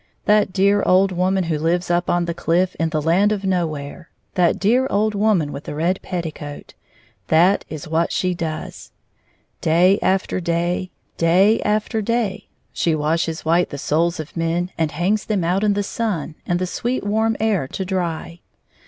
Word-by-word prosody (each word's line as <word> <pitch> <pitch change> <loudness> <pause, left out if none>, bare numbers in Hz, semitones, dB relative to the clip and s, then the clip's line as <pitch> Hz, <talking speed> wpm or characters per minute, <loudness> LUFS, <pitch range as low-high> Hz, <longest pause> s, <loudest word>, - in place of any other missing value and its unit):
That 210 -2 +3
dear 200 +2 +3
old 190 +1 +3
woman 185 +1 +1
who 160 -3 -1
Kves 175 +3 0
up 175 +1 +1
on 175 0 +1
the 170 - -2
cKff 175 +2 +1
in 165 0 0
the 155 -1 -2
Land 185 +6 +3
of 205 -2 -2
Nowhere 170 -3 -3
— - - -46
that 175 -2 +2
dear 245 +7 +2
old 215 +2 +1
woman 200 -8 +1
with 140 - -8
the - - -5
red 175 +5 0
petticoat 155 -4 -6 0.3
— 115 - -32 0.2
that 175 +5 +3
is 155 -2 -7
what 165 +2 0
she 185 -1 0
does. 165 -3 -6 0.7
Day 180 +5 +4
after 190 0 0
day, 175 +1 -1 0.3
day 185 +7 +4
after 215 +1 0
day, 220 -2 -1 0.3
she 165 -2 +1
washes 160 +2 -1
white 170 +2 +2
the 145 - -6
souls 170 +5 0
of 155 0 -7
men, 170 +2 -1
and 160 -2 0
hangs 185 +8 0
them 205 -5 0
out 180 +4 +1
in 205 -1 +2
the 205 - 0
sun 200 -8 -3
and 175 - +1
the 185 - -1
sweet 240 +7 -2
warm 220 +2 +1
air 210 -11 +1
to 190 - -5
dry. 175 -2 -3
180 Hz, 180 wpm, -21 LUFS, 165-200 Hz, 0.7 s, Day